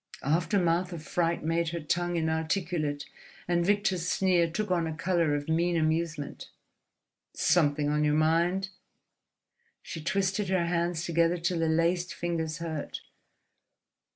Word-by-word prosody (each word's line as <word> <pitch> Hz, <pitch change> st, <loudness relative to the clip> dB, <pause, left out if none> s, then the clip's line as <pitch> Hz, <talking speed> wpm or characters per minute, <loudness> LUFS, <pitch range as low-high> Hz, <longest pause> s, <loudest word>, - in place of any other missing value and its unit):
Aftermath 175 Hz, +3 st, +1 dB
of 160 Hz, -2 st, -7 dB
fright 170 Hz, +1 st, 0 dB
made 165 Hz, +1 st, 0 dB
her 170 Hz, +1 st, -4 dB
tongue 175 Hz, +3 st, -1 dB
inarticulate; 160 Hz, -2 st, -1 dB, 0.4 s
and 175 Hz, 0 st, +2 dB
Victor's 195 Hz, -2 st, +1 dB
sneer 180 Hz, -3 st, +2 dB
took 205 Hz, +4 st, -3 dB
on 170 Hz, -2 st, +1 dB
a 160 Hz, -, -4 dB
colour 170 Hz, -4 st, +1 dB
of 145 Hz, 0 st, -4 dB
mean 170 Hz, +2 st, +1 dB
amusement. 155 Hz, -2 st, -2 dB, 0.9 s
"Something 145 Hz, -3 st, +2 dB
on 150 Hz, +1 st, +1 dB
your 150 Hz, 0 st, +2 dB
mind?" 170 Hz, +5 st, +2 dB, 1.1 s
She 160 Hz, -, -7 dB
twisted 195 Hz, +2 st, 0 dB
her 185 Hz, -2 st, +2 dB
hands 170 Hz, 0 st, -1 dB
together 170 Hz, +1 st, +2 dB
till 170 Hz, 0 st, -1 dB
the 165 Hz, -1 st, +1 dB
laced 170 Hz, +2 st, +1 dB
fingers 165 Hz, -3 st, -2 dB
hurt. 160 Hz, -3 st, -5 dB
170 Hz, 130 wpm, -29 LUFS, 160-175 Hz, 1.1 s, and